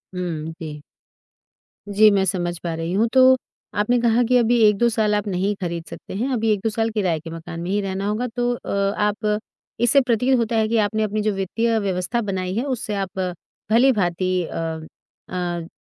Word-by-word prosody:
हुँ, 165 -3 -3
जी। 150 -2 -7 1.1
जी, 210 +1 +6
मैं 195 -1 +3
समझ 175 -3 -1
पा 170 -2 -3
रही 165 +2 -3
हूँ। 220 +4 +3
तो 260 0 +7 0.4
आपने 240 +4 +2
कहा 235 +1 +3
कि 250 - +5
अभी 240 0 +3
1-2 210 +3 +3
साल 215 -2 +1
आप 205 0 -1
नहीं 195 +2 0
खरीद 170 -2 -3
सकते - - -9
हैं। 245 +6 -1
अभी 225 -2 +1
1-2 210 +2 -1
साल 225 +1 0
किराए 185 -7 0
के 165 +1 -9
मकान 165 +1 -7
में 175 - -4
ही 205 - +1
रहना 195 0 -3
होगा। 220 +4 -1
तो 245 0 +1
अ, - - -8 0.3
आप 210 0 0 0.4
इससे 275 +4 +5
प्रतीत 250 +1 +2
होता 230 -1 0
है 220 -1 +2
कि 230 +1 +1
आपने 220 +1 -1
अपनी 215 0 -1
जो 215 0 +1
वित्तीय 225 +4 0
व्यवस्था 195 +4 -1
बनाई 185 -3 -3
है 235 - 0
उससे 235 -6 -3
आप 190 -1 -4 0.5
भली-भाँति 185 -7 +2
अ 160 -1 -4 0.5
अ, 175 -2 -3
205 Hz, 190 wpm, -22 LUFS, 180-230 Hz, 1.1 s, तो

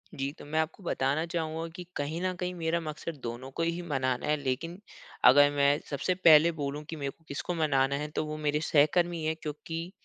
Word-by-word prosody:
जी, 135 +1 -2
तो - - -10
मैं 155 +2 -1
आपको 160 +5 -2
बताना 145 0 0
चाहूँगा 165 -1 -3
कि 180 - -6
कहीं 155 +4 -3
न 185 0 0
कहीं 180 0 -3
मेरा 170 0 -1
मकसद 155 -1 -6
दोनों 120 +3 -5
को 165 - 0
ही 170 +1 -1
मनाना 130 -6 -1
है, 150 - +3
लेकिन 145 +6 -3 0.5
अगर 145 +3 +8
मैं 145 +1 +3
सबसे 165 +6 -1
पहले 165 -2 +7
बोलूँ 145 -1 -4
कि 165 - -4
मेरे 140 -2 -3
को 165 - -31
किसको 140 +5 -3
मनाना 140 -3 +2
है, 150 +1 -3
तो 150 +1 -2
वो 155 0 -5
मेरे 150 0 0
सहकर्मी 160 +3 +2
हैं। 160 0 0
क्योंकि 165 +3 -5
155 Hz, 210 wpm, -29 LUFS, 145-165 Hz, 0.5 s, अगर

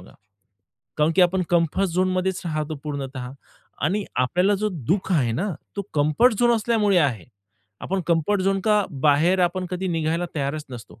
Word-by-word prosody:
बघा. 90 - -16 0.9
कारण 150 +2 +3
की 185 - +6
आपण 185 +1 +2
कम्फर्ट 175 +3 +2
झोनमध्येच 185 +1 0
राहतो 155 -2 -3
पूर्णतः 135 -3 -5 0.6
आणि 200 +6 0
आपल्याला 180 +11 +2
जो 215 - +2 0.2
दु:ख 185 +2 0
आहे 125 -8 +2
ना, 190 - -1 0.3
तो 200 - -2
कम्फर्ट 155 +11 +3
झोन 240 0 +4
असल्यामुळे 215 -4 +2
आहे. 125 - 0 0.6
आपण 195 +1 -2
कम्फर्ट 170 +5 +1
झोनच्या 195 +2 +2 0.2
बाहेर 155 +6 +3
आपण 180 +1 -2
कधी 185 +1 -3
निघायला 165 +1 -1
तयारच 145 +2 -2
नसतो. 120 -2 -11
175 Hz, 155 wpm, -23 LUFS, 150-195 Hz, 0.9 s, की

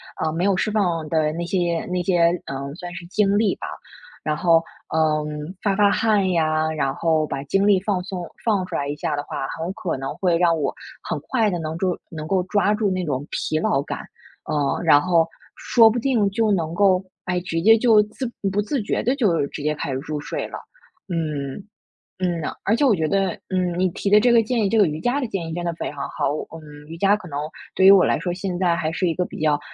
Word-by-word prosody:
啊， 160 0 -1
没 170 +3 -2
有 200 -1 +3
释 215 - 0
放 175 -7 0
的 155 -2 +1
那 170 +1 -3
些 175 -2 0
那 180 -1 0
些， 175 -2 +3 0.2
嗯， 140 +1 -5
算 175 0 -8
是 175 - -8
精 200 +1 +2
力 215 -3 +2
吧。 - - -7 0.6
然 155 -1 0
后， 165 -2 +4 0.3
呃， 155 -1 +1 0.4
发 200 -2 +1
发 205 0 +4
汗 205 -4 +2
呀， 155 -1 +1
然 140 -3 -1
后 160 -1 +1
把 140 -1 -4
精 195 +8 +1
力 195 -2 +5
放 195 -1 -1
松 180 -3 -5 0.2
放 210 -5 +1
出 175 - -5
来 140 -2 -1
一 145 - -3
下 150 0 -2
的 145 - -3
话， 135 - -4
很 165 +3 -3
可 185 -9 -3
能 135 +2 -5
会 175 -3 +2
让 170 -2 +3
我 140 - -1 0.3
很 - - -3
快 225 -5 +2
地 175 - -2
能 160 0 -4
够 180 0 0
能 155 -2 -7
够 190 +1 +2
抓 205 +2 +1
住 210 -1 0
那 185 -2 -1
种 140 -2 -2
疲 155 - -1
劳 140 -3 +1
感， - - -5 0.5
呃， 145 -2 0
然 145 -3 +6
后 165 -1 +2 0.3
说 230 -2 +5
不 240 - -1
定 235 -5 +2
就 220 0 +1
能 165 -4 0
够， 190 0 +3 0.2
哎， 180 0 0
直 165 -2 -2
接 225 +4 +7
就 220 -2 +5
自 215 +5 -6 0.3
不 200 - 0
自 250 +3 -2
觉 - - -1
地 250 +4 +1
就 185 - +2
直 145 - -8
接 150 +1 0
开 145 - -4
始 - - -2
入 150 0 -4
睡 - - -4
了。 - - -7 0.5
嗯， 155 -2 -3 0.6
嗯 175 -2 0
呐， - - -3
而 215 - +2
且 285 - +2
我 240 - +5
觉 160 -2 0
得， 195 -1 +1 0.2
嗯， 180 -2 -1
你 185 - +2
提 190 - -5
的 210 +1 +7
这 240 +2 +4
个 230 -1 +5
建 230 0 0
议 195 - +1
这 225 - +1
个 205 - +6
瑜 155 0 -3
伽 245 - +1
的 255 - -2
建 190 -6 -4
议 - - -5
真 175 0 -4
的 170 - -1
非 - - -4
常 140 -1 -5
好， 140 - -1 0.2
嗯。 150 -2 -12
瑜 165 - -8
伽 200 +3 +4
可 185 - -11
能 145 -3 -5 0.4
对 190 - +4
于 195 - +10
我 195 -2 +7
来 - - +2
说 175 - -2
现 180 -1 -3
在 175 -2 +2
还 155 -1 -1
是 180 +1 0
一 165 - 0
个 180 - 0
比 - - -9
较， 150 -2 +2
175 Hz, 260 characters per minute, -22 LUFS, 155-200 Hz, 0.6 s, 于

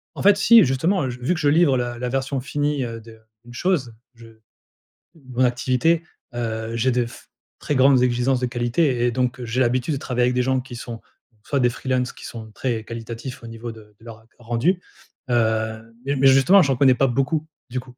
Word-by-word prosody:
En - - -5
fait 200 0 +6
si, 225 0 +7
justement, 145 +6 +1
heu, 130 - -2
je 125 +1 -8
vu 155 +9 0
que 165 - -5
je 145 - +2
livre 150 -3 +4
la 120 -1 -3
la 125 0 -3
version 135 +1 -2
finie, 145 0 -1
heu, 115 -1 -6
de 110 0 -14 0.3
d'une 120 0 -13
chose 140 -9 -1 0.2
je 115 0 -15 0.9
mon 130 -4 -2
activité, 130 +7 +1 0.3
heu, 115 -1 -3
j'ai 130 +3 +2
de 120 -1 +1
f 115 - -13 0.3
très 150 - -2
grandes 130 -1 +5
exigences 125 +1 +1
de 125 - 0
qualité 120 +1 0
et - - +2
donc 125 +1 -2
j'ai 120 +3 -2
l'habitude 130 +4 +1
de - - -3
travailler 125 -2 -1
avec 125 0 +1
des 125 - +2
gens 130 0 +1
qui 125 -1 -10
sont 120 0 -7 0.4
donc, 105 - -34
soit 140 -2 -1
des 120 -1 +3
freelances 125 0 -2
qui - - -14
sont 110 -2 -9
très 115 -2 -3
qualitatifs 115 +2 -7
au 115 - -9
niveau 115 +1 -7
de 105 -2 -16
de - - -20
leur, 115 -2 -10
heu, 110 - -23
ren 120 - -18
rendu. 175 +11 +1 0.5
Hem, 110 -1 -1
mais 140 +1 -1
mais 135 0 +2
justement 135 +9 +6
j'en 135 -3 +1
connais 130 -1 +5
pas 135 - +2
beaucoup, 135 +5 -1 0.2
du 125 +1 -2
coup. 125 0 -15
125 Hz, 225 wpm, -22 LUFS, 120-135 Hz, 0.9 s, si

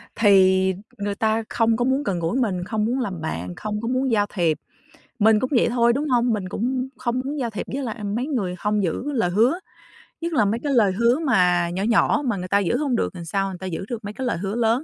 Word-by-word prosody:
thì 190 -2 +4 0.2
người 205 -1 -3
ta 220 +1 +1
không 230 -1 +2
có 245 - +1
muốn 265 +2 +1
gần 190 -9 -1
gũi 170 +8 -1
mình, 190 -8 0
không 215 +2 -1
muốn 245 +4 0
làm 190 -9 -3
bạn, 90 - -4
không 210 0 -4
có 230 - -3
muốn 255 +1 0
giao 205 -2 +3
thiệp. 170 -5 +1 0.6
Mình 220 0 +5
cũng 255 - -2
vậy - - +3
thôi, 235 0 +3
đúng 290 +4 -1
hông? 245 -1 +2
Mình 195 -4 -3
cũng 255 +6 -2
không 240 +1 -1
muốn 290 +2 -3
giao 240 -3 -1
thiệp 210 -4 -5
với 275 +1 -2
lại 225 -3 -5
mấy 220 +6 -2
người 205 -12 -2
hông 210 +1 0
giữ 190 - -2
lời 225 -9 +1
hứa, 230 - +2 0.6
nhất 335 0 -3
là 225 -8 +3
mấy 215 +3 0
cái 285 -2 0
lời 215 -6 +4
hứa 235 +7 +2
mà 180 - +2
nhỏ 185 +3 -3
nhỏ 230 +6 +3
mà 235 -5 0
người 180 0 -5
ta 200 +2 +3
giữ 190 -4 0
hông 280 -5 0
được 230 - -1
làm 175 -2 -8
sao 195 +3 -1
người 185 - -7
ta 190 - -7
giữ 180 +1 -4
được 235 -3 -5
mấy 205 - -5
cái 260 +3 -4
lời 235 - -1
hứa 195 +4 -3
lớn. 235 +3 +1
220 Hz, 260 wpm, -23 LUFS, 190-245 Hz, 0.6 s, Mình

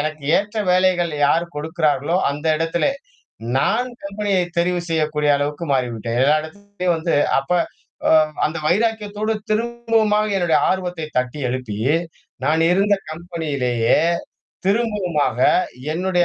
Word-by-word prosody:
எனக்கு 155 0 -3
ஏற்ற 210 +2 -2 0.2
வேலைகள் 180 -2 +2
யார் 165 +4 +2
கொடுக்கிறார்களோ 155 0 0
அந்த 145 +3 -6
இடத்திலே, 165 - 0 0.7
நான் 230 - +1 0.2
கம்பெனியை 200 -1 0 0.2
தெரிவு 175 +1 +1
செய்யக்கூடிய 150 -2 +1
அளவுக்கு 145 +3 -2
மாறிவிட்டேன். 120 -3 -1
எல்லா 145 +3 +4
இடத்துலயும் 185 +1 -3
வந்து 165 +1 -1 0.3
அப்ப 135 +6 -2 0.5
உம் 155 -1 +4
அந்த 160 +3 -1
வைராக்கியத்தோடு 215 +2 0 0.2
திரும்பவுமாக 225 -2 +1
என்னுடைய 170 -5 +3
ஆர்வத்தைத் 180 -4 -3
தட்டி 125 +3 -2
எழுப்பி, 120 -5 -4 0.7
நான் 160 +1 +2
இருந்த 200 +3 +3 0.2
கம்பெனியிலேயே 145 -9 0 0.7
திரும்பவுமாக 195 - 0 0.6
என்னுடைய 180 0 +1
170 Hz, 110 wpm, -20 LUFS, 150-200 Hz, 0.7 s, எல்லா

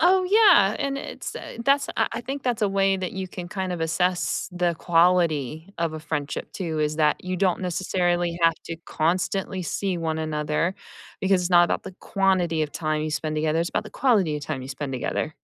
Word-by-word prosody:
Oh, 370 +2 +5
yeah, 365 - +6
and 275 -1 -2
it's, - - -7
uh - - -9
that's, 275 0 +3
I - - +2
I 230 - -2
think 270 +2 -5
that's 240 -3 -1
a 205 - +3
way 195 0 +2
that 185 -1 -4
you 190 -1 -4
can 175 -1 -7
kind 190 0 -3
of 175 - -4
assess 180 +5 0
the 175 -1 0
quality 165 -2 +2
of 165 -2 0
a 155 - -6
friendship 150 -2 -4
too, 165 -5 -3
is 150 0 0
that 150 -1 +2
you 185 0 -2
don't 185 -1 +1
necessarily 175 -1 0
have 165 -1 +5
to 165 - -5
constantly 185 +3 -1
see 185 +2 -2
one 160 -1 -2
another, 155 +3 -1 0.5
because 190 -1 +2
it's 175 - -2
not 175 -1 +7
about - - -2
the - - -7
quantity 185 -5 +1
of 150 - -3
time 155 -1 -1
you 155 - -2
spend 155 +1 -2
together, 155 +1 +1
it's 170 - 0
about - - -2
the - - -10
quality 200 - +3
of 145 - -7
time 130 - -4
you 130 - -8
spend 135 0 -5
together. 150 +4 -2
175 Hz, 215 wpm, -24 LUFS, 155-195 Hz, 0.5 s, not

